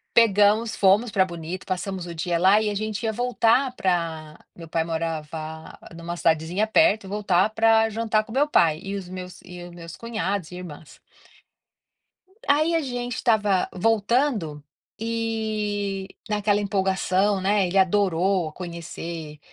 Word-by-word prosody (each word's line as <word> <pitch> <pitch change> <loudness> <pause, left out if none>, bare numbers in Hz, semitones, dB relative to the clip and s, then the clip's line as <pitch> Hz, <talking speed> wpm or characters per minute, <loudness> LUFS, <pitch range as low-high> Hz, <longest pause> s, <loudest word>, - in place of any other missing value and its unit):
Pegamos, 215 0 +4
fomos 205 +4 +3
para 190 -1 +4
Bonito, 175 0 -6
passamos 185 0 -3
o 170 - -7
dia 170 +1 -1
lá, 190 +5 +5
e 215 - 0
a 205 - -2
gente 215 +2 -3
ia 220 - 0
voltar 245 +2 +2
pra 165 -4 -2 0.2
meu 170 - -10
pai 165 0 0
morava 160 -1 -5 0.2
em 170 - -10
uma 170 +1 -4
cidadezinha 165 +5 +1
perto, 220 -3 +3
voltar 200 -2 +2
para 225 0 +4
jantar 220 0 0
com 220 - -11
o - - -7
meu 290 +3 +2
pai, 160 - +3
e 195 +1 -4
os 190 -3 -7
meus 185 0 -8
e 180 -1 -10
os 175 - -9
meus 170 -1 -10
cunhados 200 -6 -3
e 180 - -8
irmãs. 160 -4 -10 1.5
Aí 310 +3 +3
a 330 - +3
gente 245 -4 -4
estava 210 -6 +2
voltando 215 - 0 0.4
e, 215 -3 -2 0.2
naquela 210 -1 +1
empolgação, 195 0 +1
né, 195 0 +2
ele 180 +2 -3
adorou 185 -3 +2
conhecer 170 -3 -7
195 Hz, 150 wpm, -24 LUFS, 170-220 Hz, 1.5 s, lá